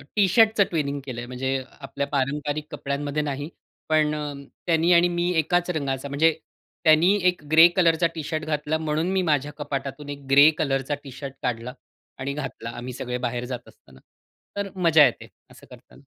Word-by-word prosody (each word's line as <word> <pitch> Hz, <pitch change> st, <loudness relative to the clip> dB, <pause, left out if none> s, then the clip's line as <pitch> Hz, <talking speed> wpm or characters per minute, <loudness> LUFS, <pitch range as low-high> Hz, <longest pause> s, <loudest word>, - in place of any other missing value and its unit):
टी-शर्टच 215 Hz, +2 st, +4 dB
twinning 145 Hz, -4 st, -2 dB
केलं 125 Hz, -3 st, -6 dB
आहे, 120 Hz, -, -8 dB
म्हणजे 130 Hz, +2 st, -3 dB, 0.3 s
आपल्या 140 Hz, 0 st, -4 dB
पारंपारिक 145 Hz, +2 st, -2 dB
कपड्यांमध्ये 145 Hz, +1 st, -3 dB
नाही. 145 Hz, +1 st, -4 dB, 0.4 s
पण 155 Hz, -1 st, +3 dB
अ, -, -, -4 dB, 0.5 s
त्यांनी 165 Hz, +1 st, +3 dB
आणि 170 Hz, +1 st, +5 dB
मी 175 Hz, 0 st, -1 dB
एकाच 175 Hz, +3 st, +1 dB
रंगाचा, 140 Hz, -4 st, -2 dB
म्हणजे 160 Hz, +4 st, +3 dB, 0.5 s
त्यांनी 160 Hz, +4 st, +5 dB
एक 180 Hz, -4 st, 0 dB
ग्रे 160 Hz, +2 st, +9 dB
कलरचा 170 Hz, -2 st, +3 dB
टी-शर्ट 155 Hz, 0 st, -3 dB
घातला 150 Hz, 0 st, -1 dB
म्हणून 160 Hz, +2 st, -1 dB
मी 190 Hz, -, +1 dB
माझ्या 145 Hz, -1 st, +1 dB
कपाटातून 140 Hz, 0 st, -5 dB
एक 140 Hz, -1 st, -8 dB
ग्रे 140 Hz, +3 st, +8 dB
कलरचा 135 Hz, -1 st, -1 dB
टी-शर्ट 135 Hz, 0 st, -8 dB
काढला 125 Hz, 0 st, -3 dB, 0.5 s
आणि 135 Hz, +1 st, -3 dB
घातला. 135 Hz, -5 st, -6 dB
आम्ही 125 Hz, +1 st, -6 dB
सगळे 125 Hz, 0 st, -4 dB
बाहेर 120 Hz, +1 st, -4 dB
जात 125 Hz, -1 st, -6 dB
असताना. 65 Hz, -1 st, -19 dB, 0.6 s
तर 200 Hz, 0 st, -2 dB
मजा 165 Hz, -5 st, +6 dB
येते, 120 Hz, -, -2 dB, 0.2 s
असं -, -, -16 dB
करताना. -, -, -17 dB
150 Hz, 165 wpm, -24 LUFS, 135-160 Hz, 0.6 s, ग्रे